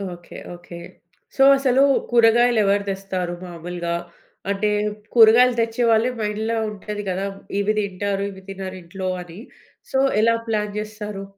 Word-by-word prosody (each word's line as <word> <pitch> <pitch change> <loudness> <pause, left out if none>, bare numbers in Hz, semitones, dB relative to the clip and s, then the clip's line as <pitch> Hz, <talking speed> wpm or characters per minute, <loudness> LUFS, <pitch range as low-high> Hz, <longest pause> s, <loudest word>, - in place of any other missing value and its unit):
Okay. 175 - -13 0.2
Okay. 175 0 -11 0.6
So, 270 - +4
అసలు 265 -1 +2 0.3
కూరగాయలు 235 0 +4
ఎవరు 200 +1 +2
తెస్తారు 190 -2 -3
మామూలుగా? 170 0 -5 0.5
అంటే 200 +1 0 0.4
కూరగాయలు 240 +2 +6
తెచ్చే 230 +1 -1
వాళ్ళే 225 +3 +3
మైండ్‌లో 215 +2 -2
ఉంటది 210 0 -6
కదా! 190 +2 -2 0.3
ఇవి 210 +2 +1
తింటారు 200 0 -2
ఇవి 190 0 -12
తినరింట్లో 185 -1 -6
అని 175 +2 -12 0.5
సో, 265 - +1 0.2
ఎలా 230 +1 +4
ప్లాన్ 210 -2 -1
చేస్తారు? 210 -2 -6
205 Hz, 125 wpm, -22 LUFS, 185-225 Hz, 0.6 s, కూరగాయలు